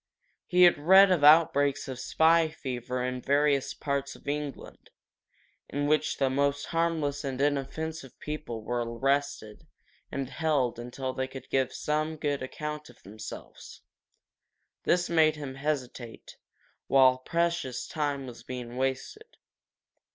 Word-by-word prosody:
He 180 0 +4
had 175 -4 +6
read 190 +5 +7
of 170 -5 +2
outbreaks 145 -2 +5
of 130 -2 -6
spy 160 +5 +3
fever 125 -3 -4
in 125 0 -3
various 140 0 +1
parts 140 -1 -3
of - - -18
England, 145 -1 -5 0.8
in 145 0 -2
which 150 0 +1
the 135 - +2
most 140 +1 0
harmless 165 -4 -1
and 135 -2 -4
inoffensive 145 +1 -2
people 150 -7 -6
were 120 +2 -2 0.2
arrested 140 -1 -1 0.4
and 135 -1 -3
held 145 -8 0
until 130 +2 -5
they 130 0 -2
could 135 0 -11
give 130 -1 +1
some 155 +1 -2
good 145 -3 -2
account 150 +3 -6
of 120 - -19
themselves. 110 +2 -10 1.0
This 180 0 +2
made 160 -2 +3
him 145 -3 -6
hesitate, 130 -4 -5 0.5
while 130 -1 +5
precious 170 -4 -1
time 145 -3 -2
was 120 -2 -10
being 125 -1 -7
wasted. 135 - -4
140 Hz, 130 wpm, -28 LUFS, 130-155 Hz, 1.0 s, read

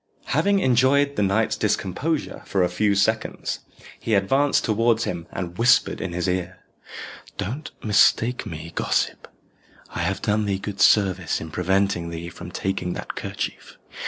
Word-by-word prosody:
Having 200 -1 +3
enjoyed 140 +1 +3
the - - 0
knight's 100 +3 +2
discomposure 105 - -1
for 95 -2 +1
a 90 - +2
few 100 +3 +1
seconds, 110 +3 0 0.4
he 110 - 0
advanced 135 +9 +2
towards 115 +1 +2
him, 85 -4 -4
and 90 -2 -5
whispered 120 +2 +3
in 95 - -3
his 90 +1 -2
ear, 90 0 -2 0.8
"Don't 120 +10 -4
mistake 115 +2 +3
me, 80 -2 -7
gossip. - - -1 0.6
I - - -5
have 90 +3 -1
done 105 0 +1
thee 100 -1 0
good 100 0 -5
service 95 -5 +3
in 80 0 -8
preventing 95 0 0
thee 85 +1 -6
from 85 0 -9
taking 95 -1 -2
that - - -6
kerchief. - - -5
100 Hz, 150 wpm, -23 LUFS, 90-115 Hz, 0.8 s, Having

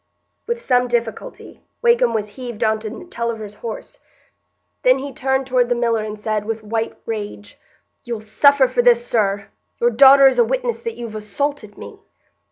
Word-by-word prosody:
With 470 0 -3
some 250 -1 +2
difficulty, 240 - -4 0.2
Wakem 470 - +4
was 215 -2 -2
heaved 240 +1 -6
on 220 0 +1
to 215 +9 -8
Tulliver's 235 - -5
horse. 220 +1 -8 0.8
Then 255 +1 +4
he 275 +1 -6
turned 265 +1 -1
toward 250 -2 +1
the 245 - +2
miller 235 -2 0
and 215 0 -6
said, 215 -1 -2
with 220 0 -4
white 225 +1 -3
rage, 205 -2 -6 0.4
"You'll 235 -3 -5
suffer 265 +5 +4
for 250 -1 +1
this, 240 -1 +4
sir. 200 -4 -1 0.3
Your 240 0 +2
daughter 275 +3 +7
is 270 - +4
a - - +7
witness - - -2
that 460 - -5
you've 235 -2 -7
assaulted 215 +1 -4
me." - - -11
235 Hz, 170 wpm, -20 LUFS, 215-265 Hz, 0.8 s, daughter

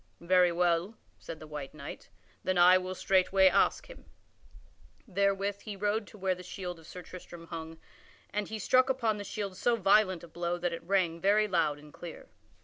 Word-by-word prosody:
"Very 180 0 +4
well," 175 +4 +1 0.2
said 160 - -8
the 155 - -10
white 150 -2 -7
knight, 150 0 -9 0.3
"then 185 -1 0
I 180 +1 +8
will 185 0 -5
straightway 190 0 +4
ask 195 +2 +2
him." - - -13 1.0
Therewith 200 0 0
he 210 -2 -6
rode 210 +2 -1
to - - -14
where 190 -1 0
the 180 - -9
shield 180 -1 -6
of 160 - -16
Sir 180 - -9
Tristram 175 -2 -11
hung, 165 -1 -7 0.6
and 210 0 -1
he 220 - -5
struck 255 +5 +3
upon 230 -5 +1
the 205 - -5
shield 200 -1 -5
so 240 +5 +2
violent 195 -4 +3
a - - -9
blow 175 +1 -3
that 175 -1 -2
it 170 - -5
rang 170 -2 +1
very 210 +2 +4
loud 165 -6 +1
and 150 0 -15
clear. 170 -2 -10
185 Hz, 190 wpm, -30 LUFS, 170-200 Hz, 1.0 s, I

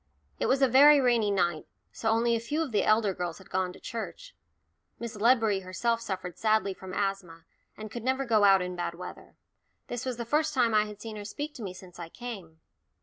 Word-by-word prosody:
It - - 0
was 270 +1 +3
a - - +7
very 285 +4 +7
rainy 240 -5 +3
night, 175 -5 0 0.2
so 225 - -2
only 230 +1 +2
a - - 0
few 290 +8 -1
of 290 - -6
the 210 - +2
elder 215 -2 +3
girls 175 -2 -4
had 190 - -17
gone 185 -1 0
to - - -14
church. 215 -8 -7 0.6
Miss 235 -1 -6
Ledbury 220 -2 +3
herself 210 +5 -1
suffered 185 -5 -5
sadly 215 -2 +2
from 190 0 -10
asthma, 195 -4 -3 0.3
and 215 -1 -8
could 235 0 -6
never 260 +2 0
go 220 -4 +3
out 195 -2 +6
in 180 0 -5
bad 175 -1 -3
weather. 180 +1 -10 0.5
This 245 0 -4
was 255 -3 -3
the 235 - -4
first 305 +4 +1
time 240 -3 +3
I 210 0 +4
had 210 -1 -10
seen 220 -1 -7
her - - -6
to 205 - -7
speak 295 +6 -5
to 205 -7 -6
since 180 -1 -13
I 170 -1 -7
came. 190 -9 -9
215 Hz, 220 wpm, -28 LUFS, 185-240 Hz, 0.6 s, a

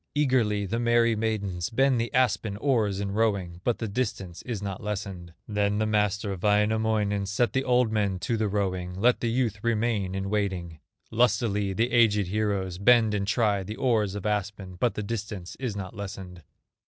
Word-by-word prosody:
Eagerly 120 -8 +2
the 115 +4 -2
merry 120 -1 +3
maidens 100 -5 -2
Bend 130 0 +2
the 115 - -3
aspen 110 -6 +1
oars 110 -6 +1
in 100 -1 -2
rowing, 100 -5 0
But 120 - +1
the 115 - -3
distance 100 -6 -3
is 120 -5 -4
not 100 -2 -5
lessened. 95 -4 -5 0.2
Then 105 -1 0
the 110 - +1
master, 105 -1 0
Wainamoinen, 105 0 +1
Set 110 +4 0
the 130 - +1
old 125 -3 +2
men 100 -3 0
to 115 - 0
the 110 -1 0
rowing, 95 -3 -2
Let 120 +4 +3
the 120 - -1
youth 115 -3 -1
remain 110 -4 0
in 95 0 -3
waiting. 95 -6 -2 0.3
Lustily 105 -3 +1
the 115 +5 0
aged 105 -4 +4
heroes 100 -3 -1
Bend 115 0 +5
and 100 -1 -1
try 105 -2 +2
the 105 +3 -6
oars 110 -6 +1
of 105 - -6
aspen, 100 -3 -2
But 120 +1 +1
the 105 - -3
distance 105 -4 -5
is 125 -6 -3
not 100 +1 -6
lessened. 95 -3 -7
105 Hz, 180 wpm, -27 LUFS, 100-115 Hz, 0.3 s, Bend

